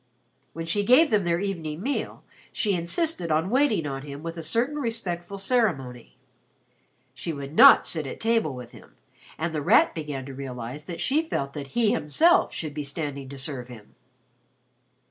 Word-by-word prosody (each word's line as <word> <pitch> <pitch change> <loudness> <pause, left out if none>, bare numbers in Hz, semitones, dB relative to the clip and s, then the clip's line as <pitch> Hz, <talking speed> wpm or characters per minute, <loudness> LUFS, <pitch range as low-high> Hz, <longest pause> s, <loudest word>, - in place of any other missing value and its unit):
When 165 0 -5
she 205 +5 0
gave 260 +8 +5
them 205 -4 +2
their 170 0 +1
evening 170 -4 -4
meal, 275 +3 -3 0.3
she 210 -3 0
insisted 180 - -1
on 160 +5 +1
waiting 255 - +2
on 135 -2 -4
him 145 +1 -9
with 165 0 -5
a 165 - -6
certain 235 - -1
respectful 200 -8 -3
ceremony. 185 - -1 1.0
She 165 - -4
would 140 -1 -7
not - - +8
sit 155 -4 -3
at - - -7
table 225 - +1
with 125 -2 -9
him, - - -16 0.4
and 160 +1 -2
The 155 - -2
Rat - - +4
began 145 -4 -5
to 135 - -8
realize 130 +1 -7
that 170 0 -6
she 290 +4 +2
felt 140 0 -2
that 140 -2 -7
he 225 -3 +4
himself 320 - +3
should 155 -3 -5
be 150 0 -4
standing 140 -2 -5
to 140 - -9
serve 130 -2 -6
him. 115 -4 -13
160 Hz, 175 wpm, -25 LUFS, 140-205 Hz, 1.0 s, not